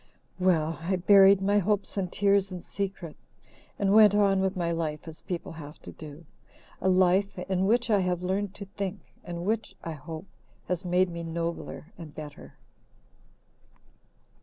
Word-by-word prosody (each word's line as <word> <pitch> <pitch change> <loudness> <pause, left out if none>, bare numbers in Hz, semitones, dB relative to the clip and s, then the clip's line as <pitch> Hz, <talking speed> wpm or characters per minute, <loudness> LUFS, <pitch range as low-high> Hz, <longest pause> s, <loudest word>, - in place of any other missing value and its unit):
Well, 165 -3 +1
I 185 +3 0
buried 195 +1 +6
my 205 +1 +3
hopes 205 +1 -1
and 185 -3 -2
tears 200 -1 +3
in 180 -2 -7
secret 190 -5 -5 0.6
and 200 -1 +2
went 210 -2 +7
on 200 -2 +3
with 190 +1 0
my 170 -1 0
life 160 -1 -3
as 160 0 -9
people 175 -2 -5
have 155 -2 -10
to - - -8
do 155 +1 -11 0.6
a 190 - +2
life 185 +2 +3
in 185 +1 -1
which 235 +2 +2
I 205 - +4
have 180 -1 -1
learned 195 +2 -2
to 200 - -7
think, 195 -1 -6
and 175 0 -6
which, 220 +1 -1
I 165 - -4
hope, 160 +4 -8 0.4
has 180 0 -2
made 180 +1 +2
me 170 0 -5
nobler 165 0 -5
and 155 -4 -10
better. 150 -2 -10
185 Hz, 160 wpm, -28 LUFS, 170-200 Hz, 0.6 s, went